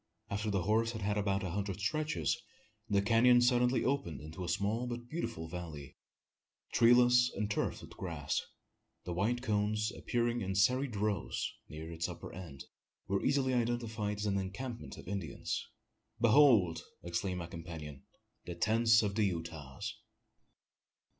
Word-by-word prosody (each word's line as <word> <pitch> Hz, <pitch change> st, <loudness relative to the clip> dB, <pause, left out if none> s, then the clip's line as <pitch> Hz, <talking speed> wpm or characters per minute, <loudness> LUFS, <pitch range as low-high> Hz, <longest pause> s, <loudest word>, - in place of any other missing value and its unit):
After 105 Hz, +2 st, -1 dB
the 100 Hz, -3 st, 0 dB
horse 115 Hz, +4 st, +2 dB
had 110 Hz, -3 st, -5 dB
made 105 Hz, +1 st, +1 dB
about 100 Hz, 0 st, 0 dB
a 90 Hz, -, -2 dB
hundred 100 Hz, 0 st, -3 dB
stretches, 105 Hz, -, 0 dB, 0.5 s
the 100 Hz, -1 st, +3 dB
canon 120 Hz, +3 st, +6 dB
suddenly 125 Hz, +1 st, +3 dB
opened 130 Hz, -, -1 dB
into 80 Hz, +5 st, -7 dB
a 85 Hz, -, -3 dB
small 105 Hz, +7 st, 0 dB
but 120 Hz, 0 st, -5 dB
beautiful 120 Hz, -, -4 dB
vallon 80 Hz, -5 st, -7 dB, 0.8 s
treeless 125 Hz, +1 st, +6 dB
and 105 Hz, +1 st, -1 dB
turfed -, -, -1 dB
with -, -, -11 dB
grass. 80 Hz, -7 st, -2 dB, 0.6 s
The 90 Hz, -, -3 dB
white 115 Hz, +7 st, 0 dB
cones, 105 Hz, +1 st, +1 dB
appearing 120 Hz, 0 st, 0 dB
in 95 Hz, -1 st, -2 dB
serried 125 Hz, +5 st, +3 dB
rows 105 Hz, 0 st, -1 dB, 0.2 s
near 80 Hz, +3 st, -7 dB
its 85 Hz, 0 st, -2 dB
upper -, -, -8 dB
end, 80 Hz, -7 st, -8 dB, 0.4 s
were 100 Hz, 0 st, 0 dB
easily 135 Hz, -1 st, +2 dB
identified 115 Hz, -3 st, -1 dB
as 105 Hz, -, -3 dB
an 100 Hz, -1 st, +1 dB
encampment 115 Hz, +6 st, -5 dB
of -, -, -11 dB
Indians. 95 Hz, -6 st, -3 dB, 0.5 s
"Behold!" 115 Hz, -, +5 dB, 0.2 s
exclaimed 90 Hz, +2 st, -2 dB
my 85 Hz, -, -4 dB
companion, 80 Hz, -5 st, -8 dB, 0.4 s
"the 85 Hz, -, -5 dB
tents 115 Hz, +2 st, +4 dB
of 100 Hz, -1 st, 0 dB
the 105 Hz, 0 st, +2 dB
Utahs!" 80 Hz, -7 st, -4 dB
105 Hz, 145 wpm, -33 LUFS, 85-120 Hz, 0.8 s, canon